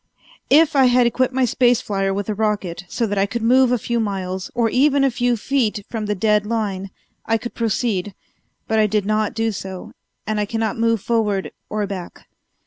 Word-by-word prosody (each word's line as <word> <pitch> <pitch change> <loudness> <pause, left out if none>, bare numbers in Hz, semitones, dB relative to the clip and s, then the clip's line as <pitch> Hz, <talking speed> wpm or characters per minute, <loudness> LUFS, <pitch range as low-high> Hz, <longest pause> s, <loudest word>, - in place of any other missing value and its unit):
If 315 +1 +5
I 270 -1 +6
had 250 0 +4
equipped 255 +2 +1
my 260 0 +2
space 245 0 +3
flier 195 -4 -1
with 200 0 -3
a 215 - -1
rocket 205 -4 -2
so 235 - -1
that 205 -2 -1
I 195 - +2
could 225 +3 -4
move 255 +2 +4
a 250 - +3
few 235 +1 -2
miles, 190 -3 -3
or 235 -1 +2
even 275 +4 +3
a 270 - +3
few 245 0 0
feet, 220 -4 -1
from 220 -3 -3
the 210 - 0
dead 210 +1 +2
line, 205 -3 -2 0.4
I 225 - +2
could 240 +2 -7
proceed, 210 -4 -1 0.5
but 220 0 +1
I 215 - +4
did 210 -1 0
not 215 0 0
do 225 0 0
so, 190 -2 -7 0.3
and 215 0 -1
I 210 - +1
cannot 225 0 -2
move 230 -2 +1
forward 210 -4 0 0.2
or 210 -1 -1
back. 190 -3 -8
220 Hz, 205 wpm, -21 LUFS, 200-240 Hz, 0.5 s, I